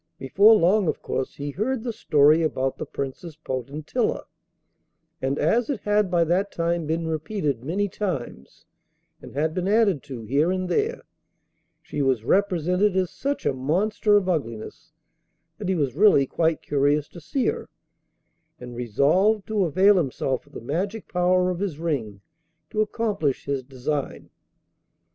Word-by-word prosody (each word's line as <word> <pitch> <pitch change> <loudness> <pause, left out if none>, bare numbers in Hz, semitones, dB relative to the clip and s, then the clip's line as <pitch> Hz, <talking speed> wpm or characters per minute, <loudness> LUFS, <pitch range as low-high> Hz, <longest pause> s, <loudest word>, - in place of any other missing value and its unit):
Before 200 +11 +5
long, 195 +1 +3
of - - -2
course, 130 - -3
he 145 0 -5
heard 225 - -2
the 240 -2 -3
story 150 -2 +4
about 135 -4 -1
the - - -5
Princess 140 +4 -6
Potentilla, 140 0 -3 1.0
and, 135 +2 -1
as 225 - +1
it 275 -7 -2
had 210 -1 +1
by 175 -1 +3
that 185 +5 0
time 170 -1 -1
been 165 +1 -1
repeated 160 - -2
many 190 +8 -1
times, 165 - -5 0.6
and - - -12
had 155 +2 0
been 185 +1 -2
added 205 - +3
to 130 -5 -7
here 140 +9 +1
and 185 0 -1
there, 440 - -1 0.8
she 145 - -4
was 130 -5 +1
represented 185 - +2
as 185 -2 0
such 280 +1 -3
a - - +2
monster 195 +10 +2
of 195 -2 0
ugliness 115 -11 -4 0.7
that 200 -3 -3
he 190 - +2
was 140 -7 0
really 195 -8 +5
quite 160 +3 0
curious 145 +1 +1
to 175 - -12
see 245 - -2
her, - - -2 0.9
and 125 -1 -9
resolved 155 - +2
to 210 -3 0
avail 190 +5 +4
himself 135 -4 -1
of - - -22
the - - -7
magic 190 - -3
power 180 0 +2
of 175 - -4
his 190 -7 -3
ring 130 -12 -3 0.5
to 215 - +1
accomplish 210 - -1
his 140 -1 -1
design. 135 +2 -4
165 Hz, 155 wpm, -24 LUFS, 140-200 Hz, 1.0 s, Before